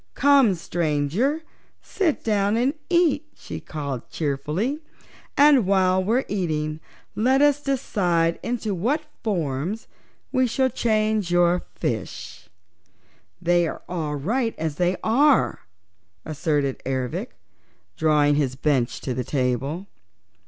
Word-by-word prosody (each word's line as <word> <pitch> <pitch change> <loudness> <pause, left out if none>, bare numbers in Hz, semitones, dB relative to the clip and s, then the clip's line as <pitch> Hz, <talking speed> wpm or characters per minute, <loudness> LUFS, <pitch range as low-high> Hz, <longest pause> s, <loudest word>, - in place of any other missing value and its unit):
"Come, 275 -8 +5
Stranger, 170 - -1 0.4
sit 345 -7 -1
down 205 -1 +1
and 255 +4 +2 0.2
eat," 335 -4 +2
she - - -7
called 140 -5 -6
cheerfully, 155 - -2 0.6
"and 280 -7 +6
while 190 -1 +3
we're 235 +7 +1
eating 155 -5 -2 0.3
let 260 +5 +2
us 290 0 +4
decide 175 -12 0
into 235 -3 -2
what 250 - 0 0.2
forms 175 - -2 0.4
we 255 -1 +2
shall 260 +3 +1
change 215 -4 +1
your 175 0 +3
fishes." - - -5 0.9
"They're 175 -1 +1
all 160 -4 -3
right 225 - -1
as 155 -2 -3
they 180 +1 +1
are," 265 - +3 0.6
asserted 145 -3 -1
Ervic, 130 -2 -3 0.6
drawing 150 -2 +3
up - - +1
his 130 -2 -1
bench 135 -3 0
to 130 - -3
the 125 +1 -2
table. 135 +7 -1
180 Hz, 115 wpm, -24 LUFS, 150-245 Hz, 0.9 s, and